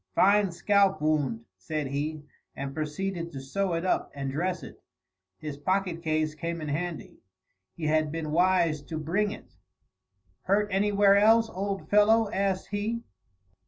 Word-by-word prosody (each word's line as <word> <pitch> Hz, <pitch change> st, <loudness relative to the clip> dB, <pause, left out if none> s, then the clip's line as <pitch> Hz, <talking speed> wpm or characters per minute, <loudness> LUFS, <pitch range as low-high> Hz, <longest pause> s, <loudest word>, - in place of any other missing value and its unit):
"Fine 200 Hz, 0 st, +4 dB
scalp 195 Hz, 0 st, +2 dB
wound," 145 Hz, -7 st, 0 dB
said 150 Hz, +10 st, -3 dB
he, 145 Hz, +3 st, -3 dB, 0.3 s
and 135 Hz, 0 st, -5 dB
proceeded 170 Hz, +3 st, -3 dB
to 135 Hz, -, -5 dB
sew 180 Hz, +8 st, -2 dB
it 165 Hz, +2 st, -2 dB
up 185 Hz, -, 0 dB
and 135 Hz, -1 st, -3 dB
dress 180 Hz, +5 st, -2 dB
it. -, -, -11 dB, 0.6 s
His 150 Hz, -2 st, -6 dB
pocket 185 Hz, +2 st, -1 dB
case 155 Hz, -1 st, 0 dB
came 165 Hz, +2 st, -4 dB
in 155 Hz, -1 st, -5 dB
handy. 165 Hz, +3 st, -4 dB, 0.6 s
He 165 Hz, -, -5 dB
had 155 Hz, 0 st, +2 dB
been 160 Hz, -1 st, -4 dB
wise 170 Hz, -2 st, +2 dB
to 160 Hz, -, -5 dB
bring 180 Hz, +7 st, 0 dB
it. 210 Hz, -, -10 dB, 0.9 s
"Hurt 205 Hz, +2 st, +2 dB
anywhere 200 Hz, 0 st, +4 dB
else, 225 Hz, +2 st, +5 dB
old 195 Hz, +1 st, -4 dB
fellow?" 210 Hz, +1 st, +4 dB
asked 195 Hz, -1 st, -1 dB
he. 220 Hz, +3 st, -2 dB
170 Hz, 150 wpm, -28 LUFS, 155-200 Hz, 0.9 s, else